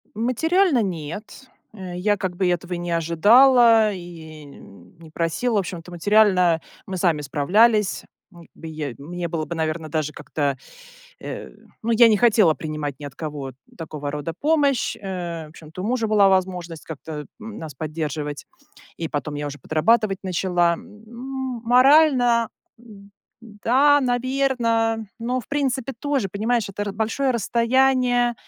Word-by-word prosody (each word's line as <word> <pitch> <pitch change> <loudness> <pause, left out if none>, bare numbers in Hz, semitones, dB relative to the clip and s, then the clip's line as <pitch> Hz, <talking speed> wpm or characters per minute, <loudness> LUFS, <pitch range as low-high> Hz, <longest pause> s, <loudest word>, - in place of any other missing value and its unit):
Материально 285 - +2
нет. 190 - -6 0.3
Э, 185 -4 -8
я 205 +3 +1
как 185 -2 -4
бы 185 0 0
этого 180 +1 -2
и - - -2
не 175 0 -4
ожидала 220 +7 +5
и 160 -4 -10
не 100 - -16
просила. 175 +9 -1
В - - +3
общем-то, 180 -2 -6
материально 180 -2 +3 0.3
мы 190 - -4
сами 165 -4 +1
справлялись, 205 - +2 0.3
м 170 -1 -15
к - - -23
бы 165 - -10
я, 155 -5 -5
мне 170 +5 -5
было 160 -2 -3
бы, 170 - -5
наверно, 160 0 -3
даже 155 -1 -2
как-то, 145 -2 -3 0.6
э, - - -7 0.3
ну, 230 - 0
я 230 +1 +7
не 215 -2 +4
хотела 210 -8 +4
принимать 150 -3 -5
ни 145 - -8
от 140 - -9
кого 145 -4 -6 0.2
такого 150 -3 -6
рода 150 +2 -4
помощь. 290 -4 +1
Э, 175 -5 -5
в - - -16
общем-то, 160 +3 -11
у - - -4
мужа 235 -2 0
была 205 -2 +4
возможность 180 -3 -1
как-то, 150 0 -7
м, 220 -1 -9
нас 155 -4 -8
поддерживать, 150 -1 -4 0.5
и 165 - -3
потом 145 -1 -4
я 145 0 -3
уже 145 0 -8
подрабатывать 195 - +1
начала. 175 -1 +1
М, 210 +5 -11 0.6
морально, 250 -2 +4 0.3
м, 200 -4 -15 0.3
м, 215 -3 -15
да, 285 +4 +5
наверно, 245 -3 0
но, 245 +2 -1
в 240 - -12
принципе, 270 -2 -1
тоже, 280 -4 -1
понимаешь, 215 +3 -1
это 195 +1 -6
р 205 - -4
большое 225 +6 -1
расстояние, 245 +1 +2
190 Hz, 155 wpm, -22 LUFS, 160-235 Hz, 0.6 s, я